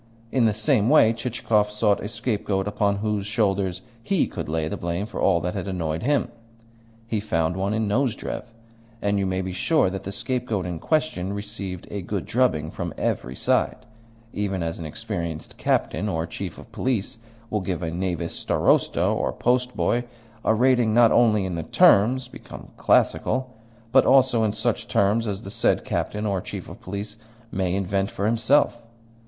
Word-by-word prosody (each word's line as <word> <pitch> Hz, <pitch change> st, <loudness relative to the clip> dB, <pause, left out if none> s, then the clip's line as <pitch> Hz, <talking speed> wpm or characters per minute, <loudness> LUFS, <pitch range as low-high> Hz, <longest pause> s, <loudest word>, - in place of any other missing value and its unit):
In 125 Hz, -3 st, +3 dB
the 110 Hz, -, +4 dB
same 110 Hz, +1 st, +2 dB
way 125 Hz, -7 st, +6 dB
Chichikov 115 Hz, -3 st, 0 dB
sought 105 Hz, -1 st, +1 dB
a -, -, -3 dB
scapegoat 105 Hz, -5 st, -1 dB
upon 105 Hz, 0 st, +1 dB
whose 105 Hz, -2 st, -1 dB
shoulders 100 Hz, -4 st, 0 dB, 0.2 s
he 190 Hz, +8 st, +1 dB
could -, -, -6 dB
lay 80 Hz, 0 st, -1 dB
the -, -, -3 dB
blame 85 Hz, +3 st, -2 dB
for -, -, -6 dB
all 90 Hz, -3 st, +4 dB
that 90 Hz, -, -2 dB
had 100 Hz, -2 st, -4 dB
annoyed 85 Hz, -4 st, -2 dB
him. 140 Hz, 0 st, +1 dB, 0.8 s
He 115 Hz, -2 st, -1 dB
found 80 Hz, -5 st, 0 dB
one 100 Hz, +3 st, -1 dB
in 110 Hz, -1 st, 0 dB
Nozdrev, 120 Hz, +3 st, -1 dB, 0.5 s
and 100 Hz, -1 st, 0 dB
you 95 Hz, -, 0 dB
may 95 Hz, 0 st, -1 dB
be 95 Hz, -, -4 dB
sure 150 Hz, -, +2 dB
that 95 Hz, -1 st, -4 dB
the 95 Hz, -, -6 dB
scapegoat 115 Hz, -3 st, -2 dB
in 85 Hz, -2 st, -4 dB
question 150 Hz, -, 0 dB
received 100 Hz, -3 st, -6 dB
a 100 Hz, -, -3 dB
good 95 Hz, +1 st, -3 dB
drubbing 80 Hz, -12 st, +1 dB
from -, -, -5 dB
every 65 Hz, +1 st, -2 dB
side, -, -, 0 dB, 0.5 s
even 100 Hz, -3 st, -2 dB
as 80 Hz, 0 st, -3 dB
an 80 Hz, -, -5 dB
experienced 80 Hz, +1 st, -5 dB
captain 105 Hz, +6 st, 0 dB
or 80 Hz, -4 st, -1 dB
chief 90 Hz, +1 st, -6 dB
of -, -, -13 dB
police 115 Hz, -4 st, -2 dB, 0.3 s
will 105 Hz, -, 0 dB
give 90 Hz, -1 st, -3 dB
a 80 Hz, -, -2 dB
knavish 90 Hz, -1 st, -2 dB
starosta -, -, +2 dB
or -, -, +1 dB
postboy 125 Hz, -1 st, +1 dB, 0.4 s
a 110 Hz, -, +3 dB
rating 120 Hz, -2 st, +3 dB
not 120 Hz, -1 st, +6 dB
only 110 Hz, -5 st, +4 dB
in 95 Hz, -, -3 dB
the 85 Hz, -, -2 dB
terms 120 Hz, +10 st, +4 dB
become -, -, -11 dB
classical, 130 Hz, -1 st, +1 dB, 0.4 s
but -, -, +5 dB
also 130 Hz, -3 st, +5 dB
in 105 Hz, -2 st, +1 dB
such 110 Hz, +1 st, -1 dB
terms 105 Hz, +3 st, +2 dB
as 100 Hz, +1 st, -4 dB
the 100 Hz, -, -7 dB
said 115 Hz, -, +1 dB
captain 105 Hz, +1 st, -2 dB
or 100 Hz, -3 st, 0 dB
chief 100 Hz, -2 st, -7 dB
of 95 Hz, +7 st, -11 dB
police 105 Hz, +1 st, -6 dB, 0.3 s
may 95 Hz, -1 st, 0 dB
invent 95 Hz, 0 st, 0 dB
for 100 Hz, -, -3 dB
himself. 120 Hz, +3 st, +2 dB
105 Hz, 175 wpm, -24 LUFS, 95-115 Hz, 0.8 s, way